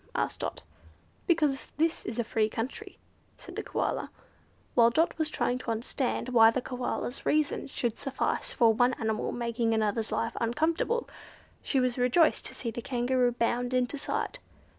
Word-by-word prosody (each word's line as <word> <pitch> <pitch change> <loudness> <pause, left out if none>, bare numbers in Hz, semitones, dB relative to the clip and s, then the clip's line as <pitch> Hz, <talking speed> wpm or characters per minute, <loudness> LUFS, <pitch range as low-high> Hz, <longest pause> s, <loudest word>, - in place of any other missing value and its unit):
asked - - -1
Dot. - - -4 0.6
"Because 300 -6 +2
this 325 +2 +1
is 225 - -4
a 235 - +1
free 220 -1 +1
country," 225 +4 -5 0.4
said - - -11
the - - -2
Koala. - - -2 0.6
While 235 -1 +6
Dot 320 +8 +2
was 315 -1 +1
trying 250 -4 0
to 255 - -6
understand 235 +2 -1
why 225 -3 +7
the 225 - 0
Koala's 250 0 -3
reason 305 -1 +1
should 240 -4 -2
suffice 270 -1 -2
for 230 -4 +4
one 245 +3 +3
animal 220 -1 -1
making 235 -1 0
another's 220 0 0
life 230 - -1
uncomfortable, 320 - 0 0.5
she 270 - 0
was 255 -1 0
rejoiced 255 +7 +3
to - - -9
see 235 - -3
the 240 - -5
Kangaroo 245 0 +1
bound 245 +1 0
into 250 +2 +1
sight. - - -3
245 Hz, 160 wpm, -29 LUFS, 230-270 Hz, 0.6 s, why